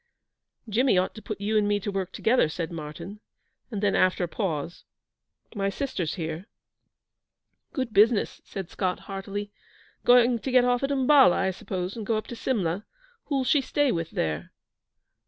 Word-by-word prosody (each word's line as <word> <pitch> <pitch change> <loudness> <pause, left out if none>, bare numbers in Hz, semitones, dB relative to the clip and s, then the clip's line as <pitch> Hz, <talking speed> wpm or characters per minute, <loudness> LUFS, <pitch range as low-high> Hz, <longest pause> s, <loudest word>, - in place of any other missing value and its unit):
'Jimmy 225 0 +3
ought 185 +1 +1
to 220 - -10
put 215 -1 -6
you 215 +2 +1
and 205 - +1
me 205 0 +2
to 205 +1 -4
work 190 -2 -3
together,' 225 -7 +2
said 165 +1 -4
Martyn; 165 +6 -7 0.5
and 210 -4 -4
then, 200 - +3
after 185 -1 +3
a - - 0
pause: 170 -4 -3 0.7
'My 195 -3 0
sister's 195 - -3
here.' 165 +1 -5 1.2
'Good 255 -5 -3
business,' 215 +2 +3
said 190 -3 -7
Scott, 185 -2 -2
heartily. 200 +1 -5 0.5
'Going 245 -1 +5
to 265 - -4
get 250 -1 +5
off 245 0 +2
at 275 - 0
Umballa, 270 -5 +5
I 190 0 +1
suppose, 185 0 -4
and 225 - -5
go 220 +1 0
up 215 - -4
to 240 - -7
Simla. 200 -7 -1 0.4
Who'll 275 -3 0
she 275 +3 +3
stay 285 +1 +1
with 165 -3 -2
there?' 80 0 -3
205 Hz, 170 wpm, -26 LUFS, 180-245 Hz, 1.2 s, Going